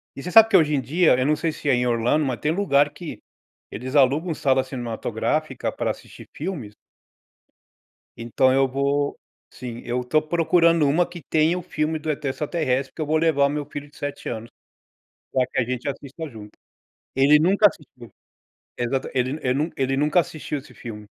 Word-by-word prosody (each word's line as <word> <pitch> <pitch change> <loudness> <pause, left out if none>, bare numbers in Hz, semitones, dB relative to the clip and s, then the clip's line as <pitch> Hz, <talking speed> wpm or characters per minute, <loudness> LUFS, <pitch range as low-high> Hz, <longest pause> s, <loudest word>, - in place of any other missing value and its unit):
E 135 - -8
você 180 - -5
sabe 225 +3 +8
que 200 - +3
hoje 155 -3 +2
em - - +1
dia, 155 +2 +3
eu 130 - +1
não 150 +2 +3
sei 160 +2 -1
ai 145 - +3
em 125 -1 +2
Orlando, 120 +6 +1
mas 130 -3 -2
tem 150 - 0
lugar 145 -7 +3
que 170 0 -8 0.5
eles 130 +3 -6
alugam 145 +6 +3
sala 135 -3 +1
cinematográfica 120 -4 -3
para - - -2
assistir - - -12
filmes 145 - -5 1.4
então 120 +3 +2
eu 135 0 +3
vou, 140 +2 0 0.4
sim, 120 -2 -8
eu 125 +1 -1
estou 140 +5 +1
procurando 165 0 +3
uma 165 +5 +3
que 175 -1 -10
tenha 160 +3 +3
o - - -4
filme 155 -1 -2
do 155 +1 -5
ET 150 0 -2
extraterrestre 135 -2 -1
porque - - -8
eu - - 0
vou 155 +2 +1
levar 155 -3 +3
o - - +2
meu 145 0 -3
filho 145 0 -8
de - - -19
7 145 0 -5
anos, 115 0 -6 0.8
para 130 -1 +2
que 130 - -5
a 130 - +3
gente 125 +2 -3
assista 140 +3 -6
junto. 110 -5 -11 0.7
Ele 140 +3 +5
nunca 195 +6 +5
assistiu, 130 - -11 0.7
ele 130 +2 -1
ele 125 - +1
nun 150 +5 0
ele 135 0 0
nunca 150 +4 +3
assistiu 150 -2 -5
esse 135 - -16
filme, 105 -3 -9
140 Hz, 185 wpm, -23 LUFS, 130-155 Hz, 1.4 s, sabe